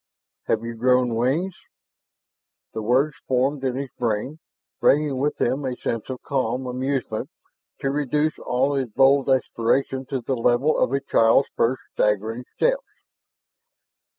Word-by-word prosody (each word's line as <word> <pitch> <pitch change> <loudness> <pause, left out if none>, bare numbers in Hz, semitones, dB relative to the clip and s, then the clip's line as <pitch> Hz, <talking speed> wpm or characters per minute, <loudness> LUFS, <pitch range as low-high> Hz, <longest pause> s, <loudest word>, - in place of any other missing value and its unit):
"Have 110 0 +1
you 115 0 -4
grown 125 +1 +2
wings?" 135 +11 0 1.2
The 110 - -3
words 135 +7 +1
formed 135 +2 +1
in 130 -2 0
his 135 -1 -4
brain, 120 +6 -2 0.4
bringing 145 -2 +3
with 145 +2 0
them 130 +4 0
a 130 -2 -2
sense 115 -1 -4
of 130 -1 -6
calm 130 -1 -1
amusement 125 -3 -2 0.5
to 135 - 0
reduce 150 +2 0
all 130 +3 0
his 135 -3 -1
bold 135 +4 +4
exploration 130 +1 +1
to 135 -2 -2
the 130 +2 -2
level 125 +5 +2
of - - +1
a 140 0 0
child's 115 0 +3
first 125 +3 +1
staggering 110 +4 0
steps. - - +1
130 Hz, 140 wpm, -23 LUFS, 120-140 Hz, 1.2 s, bold